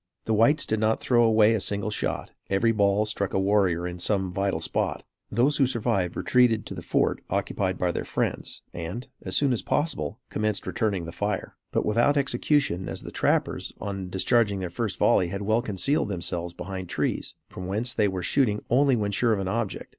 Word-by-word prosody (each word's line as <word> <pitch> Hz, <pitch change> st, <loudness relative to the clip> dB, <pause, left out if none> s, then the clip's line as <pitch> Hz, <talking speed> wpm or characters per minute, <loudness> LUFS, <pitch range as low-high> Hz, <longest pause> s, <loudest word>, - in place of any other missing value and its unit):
The 110 Hz, -, +1 dB
whites 115 Hz, +8 st, +4 dB
did 110 Hz, -, -1 dB
not 110 Hz, +1 st, +2 dB
throw 120 Hz, -2 st, +3 dB
away 110 Hz, -1 st, +5 dB
a 110 Hz, -, +1 dB
single 100 Hz, +2 st, -2 dB
shot; -, -, -3 dB, 0.2 s
every 100 Hz, +4 st, +3 dB
ball 100 Hz, -1 st, +2 dB
struck 100 Hz, -3 st, -2 dB
a -, -, +3 dB
warrior 95 Hz, -3 st, +2 dB
in 90 Hz, 0 st, -6 dB
some 95 Hz, 0 st, 0 dB
vital 95 Hz, -2 st, -1 dB
spot. 80 Hz, -, -1 dB, 0.3 s
Those 135 Hz, +5 st, +2 dB
who 135 Hz, -, +4 dB
survived 100 Hz, -8 st, 0 dB
retreated 120 Hz, -4 st, +3 dB
to -, -, -6 dB
the -, -, -7 dB
fort -, -, 0 dB
occupied 95 Hz, -1 st, -1 dB
by 90 Hz, -1 st, +1 dB
their -, -, -3 dB
friends, -, -, -2 dB
and, 85 Hz, +9 st, -5 dB
as -, -, -2 dB
soon 140 Hz, -3 st, +3 dB
as 115 Hz, -, -1 dB
possible, 145 Hz, -6 st, -1 dB
commenced 105 Hz, -1 st, -1 dB
returning 100 Hz, -7 st, -1 dB
the 85 Hz, -, -6 dB
fire; 100 Hz, +3 st, -3 dB, 0.2 s
but -, -, 0 dB
without 120 Hz, +7 st, +3 dB
execution, 135 Hz, -, +1 dB
as -, -, -6 dB
the -, -, -8 dB
trappers, -, -, 0 dB
on 95 Hz, -2 st, -4 dB
discharging 100 Hz, +2 st, +2 dB
their 90 Hz, -2 st, -4 dB
first 110 Hz, +2 st, -3 dB
volley, 90 Hz, -, +3 dB
had 100 Hz, +3 st, -4 dB
well 110 Hz, +3 st, +2 dB
concealed 120 Hz, -, 0 dB
themselves 85 Hz, -2 st, -4 dB
behind 95 Hz, -2 st, -6 dB
trees, -, -, -2 dB
from 90 Hz, 0 st, -7 dB
whence 110 Hz, +6 st, 0 dB
they 105 Hz, -, +2 dB
were 95 Hz, -2 st, -3 dB
shooting 105 Hz, -2 st, +1 dB
only 135 Hz, +1 st, +4 dB
when 105 Hz, -3 st, -1 dB
sure 115 Hz, +3 st, +2 dB
of 105 Hz, -, -1 dB
an 95 Hz, -, -2 dB
object. 110 Hz, +1 st, -3 dB
105 Hz, 200 wpm, -26 LUFS, 95-115 Hz, 0.3 s, away